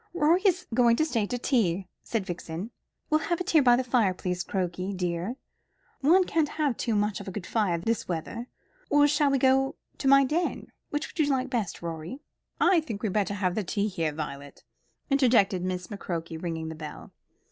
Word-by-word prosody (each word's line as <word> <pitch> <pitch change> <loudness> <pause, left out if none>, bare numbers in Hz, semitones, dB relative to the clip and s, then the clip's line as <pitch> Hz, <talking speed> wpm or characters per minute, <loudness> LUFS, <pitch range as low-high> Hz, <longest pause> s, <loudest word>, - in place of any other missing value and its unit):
"Rorie 340 +2 +4
is 360 -1 +1
going 235 -1 +5
to 310 - +2
stay 235 -9 0
to 245 - -2
tea," 200 -8 +1
said 225 -5 -2
Vixen. 175 +3 -5 0.4
"We'll 310 - +4
have 345 - +1
it 360 - -2
here 315 - +6
by 245 -2 +6
the 255 - 0
fire, 235 -7 +2
please, 180 -1 -3
Crokey 185 0 -2
dear. 180 +5 -2 0.6
One 345 +7 +5
can't 320 -4 0
have 295 -5 0
too 225 0 -1
much 210 0 0
of 200 - -9
a - - -4
good 185 -1 -6
fire 205 -7 +1
this 225 +6 -1
weather. 185 +8 -4 0.4
Or 290 0 +5
shall 290 0 +3
we 275 - +2
go 265 +1 +3 0.2
to 275 - -1
my 275 0 +7
den? 330 +6 -2 0.2
Which 295 +1 -2
would - - -13
you 295 -2 +3
like 260 -1 -1
best, 220 -9 -2
Rorie?" 170 - -6 0.4
"I 355 0 +5
think 225 -8 -6
we 215 - +1
had - - -4
better 205 -1 0
have 200 +1 0
tea 205 +1 0
here, 165 -6 -1
Violet," 145 -2 -7 0.5
interjected 230 -9 +3
Miss 180 -1 -2
McCroke, 170 -4 -5
ringing 160 -2 -3
the - - -5
bell. 155 -1 -9
215 Hz, 200 wpm, -27 LUFS, 180-275 Hz, 0.6 s, my